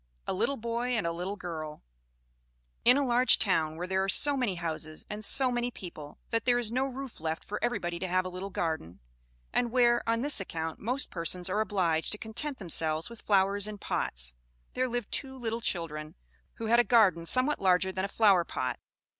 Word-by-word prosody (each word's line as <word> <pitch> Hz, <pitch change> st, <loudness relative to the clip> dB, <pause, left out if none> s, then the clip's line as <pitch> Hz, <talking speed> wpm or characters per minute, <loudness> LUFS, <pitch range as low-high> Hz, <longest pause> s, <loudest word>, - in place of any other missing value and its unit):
A -, -, -1 dB
Little 230 Hz, +9 st, 0 dB
Boy 235 Hz, +2 st, -2 dB
and 215 Hz, -, -1 dB
a 170 Hz, -, 0 dB
Little 180 Hz, +4 st, -4 dB
Girl 155 Hz, -5 st, -6 dB, 1.0 s
In 250 Hz, +3 st, +6 dB
a 285 Hz, -, +2 dB
large 250 Hz, +1 st, +5 dB
town, 160 Hz, -6 st, +1 dB
where 175 Hz, -, -3 dB
there 190 Hz, +1 st, 0 dB
are 195 Hz, -, -1 dB
so 285 Hz, +8 st, +4 dB
many 245 Hz, -8 st, 0 dB
houses, 160 Hz, -2 st, -3 dB
and 210 Hz, +1 st, -5 dB
so 255 Hz, +4 st, +2 dB
many 240 Hz, 0 st, 0 dB
people, 170 Hz, -9 st, -10 dB
that 230 Hz, 0 st, 0 dB
there 245 Hz, -1 st, +4 dB
is 235 Hz, -3 st, 0 dB
no 260 Hz, +3 st, +1 dB
roof 270 Hz, -1 st, -7 dB
left 160 Hz, 0 st, -3 dB
for 210 Hz, -, -5 dB
everybody 175 Hz, -8 st, -1 dB
to 185 Hz, -, -2 dB
have 185 Hz, +1 st, +1 dB
a -, -, -3 dB
little 185 Hz, +2 st, -6 dB
garden; 160 Hz, -, -3 dB, 0.5 s
and 240 Hz, -, +1 dB
where, 240 Hz, -1 st, +4 dB
on 230 Hz, 0 st, +2 dB
this 290 Hz, -1 st, +1 dB
account, 160 Hz, -4 st, -4 dB
most 250 Hz, +6 st, 0 dB
persons 180 Hz, +2 st, -1 dB
are 210 Hz, +3 st, +1 dB
obliged 180 Hz, -6 st, 0 dB
to -, -, -5 dB
content 240 Hz, +7 st, -4 dB
themselves 160 Hz, -1 st, +1 dB
with 235 Hz, -, -9 dB
flowers 200 Hz, 0 st, +2 dB
in 210 Hz, -1 st, -6 dB
pots; -, -, -2 dB, 0.4 s
there 255 Hz, 0 st, 0 dB
lived 240 Hz, -2 st, -3 dB
two 265 Hz, -1 st, -2 dB
little 230 Hz, -2 st, -3 dB
children, 155 Hz, -6 st, -3 dB, 0.4 s
who 230 Hz, -, -5 dB
had 235 Hz, +2 st, +4 dB
a -, -, +6 dB
garden 205 Hz, -9 st, +4 dB
somewhat 260 Hz, -, +4 dB
larger 190 Hz, 0 st, +3 dB
than 185 Hz, 0 st, -3 dB
a -, -, 0 dB
flower 200 Hz, -4 st, +4 dB
pot. 130 Hz, -5 st, -3 dB
200 Hz, 205 wpm, -30 LUFS, 170-240 Hz, 1.0 s, In